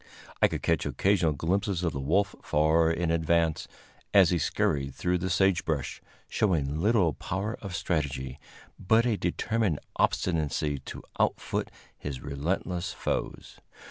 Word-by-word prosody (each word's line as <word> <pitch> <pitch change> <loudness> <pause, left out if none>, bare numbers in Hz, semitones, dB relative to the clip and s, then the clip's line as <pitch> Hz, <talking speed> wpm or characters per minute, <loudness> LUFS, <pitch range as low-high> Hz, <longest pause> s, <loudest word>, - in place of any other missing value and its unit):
I - - +7
could - - -5
catch - - +2
occasional 95 -5 +2
glimpses 95 +5 -1
of 85 - 0
the 70 - -3
wolf 95 +9 +1
far 80 +2 +3
in 80 0 0
advance, 85 -1 +1 0.5
as 95 -4 +7
he 90 - +2
scurried 70 -2 0
through 90 0 0
the 95 +2 -2
sagebrush, 85 -6 +1 0.3
showing 80 -7 0
little 100 -6 +3
power 100 - -3
of 95 -3 -5
strategy, 70 -5 -2 0.4
but 110 +5 +3
a 120 -3 +2
determined 100 -1 0 0.2
obstinacy 75 -4 0
to - - -8 0.2
outfoot - - 0 0.3
his 70 -3 -6
relentless 85 +5 -2
foes. - - -4
85 Hz, 135 wpm, -28 LUFS, 75-95 Hz, 0.5 s, I